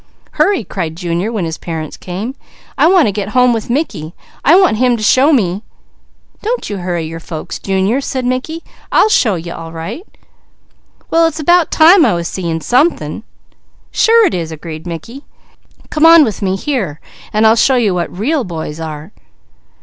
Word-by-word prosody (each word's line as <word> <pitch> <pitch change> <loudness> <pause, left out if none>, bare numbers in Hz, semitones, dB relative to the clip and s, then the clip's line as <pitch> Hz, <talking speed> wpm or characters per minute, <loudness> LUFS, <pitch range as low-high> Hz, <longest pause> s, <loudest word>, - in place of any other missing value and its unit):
"Hurry!" 400 - +1
cried 165 -5 -5
Junior 175 +4 -2
when 210 -7 -2
his 160 0 -5
parents 160 -3 -6
came. 195 +8 -6 0.4
"I 290 +3 +4
want 355 - +4
to - - +1
get 205 0 -4
home 250 -1 +5
with 225 0 -4
Mickey. 235 - -3 0.3
I 315 - +6
want 360 - +3
him 245 0 +2
to 215 - -5
show 260 +8 +4
me 200 - +1 0.4
" - - -38
"Don't 465 - -3
you 205 - -3
hurry 175 -3 -3
your 165 +1 -7
folks, 160 -1 -7
Junior," 195 +7 0
said 260 -2 -3
Mickey, 255 +7 -3 0.3
"I'll 435 - +4
show 220 - +2
you 170 0 -6
all 165 -1 -8
right!" 170 - -6 1.1
"Well 330 0 +4
it's 320 -1 -5
about 345 +2 +3
time 335 +3 +6
I 180 - +3
was 170 0 -3
seeing 170 -4 -3
something." 280 - 0 0.7
"Sure 455 0 +4
it - - 0
is," 165 -3 -3
agreed 160 +1 -8
Mickey. 230 - -8 0.7
"Come 310 +1 +4
on 330 -1 +8
with 220 -6 -3
me 190 -1 0
here, 195 - -3 0.3
and 215 +1 +2
I'll 220 +1 +6
show 260 +3 +3
you 225 -6 +2
what 175 -1 -2
real 270 - -1
boys 160 -4 -6
are!" 155 +2 -7
215 Hz, 180 wpm, -15 LUFS, 170-285 Hz, 1.1 s, on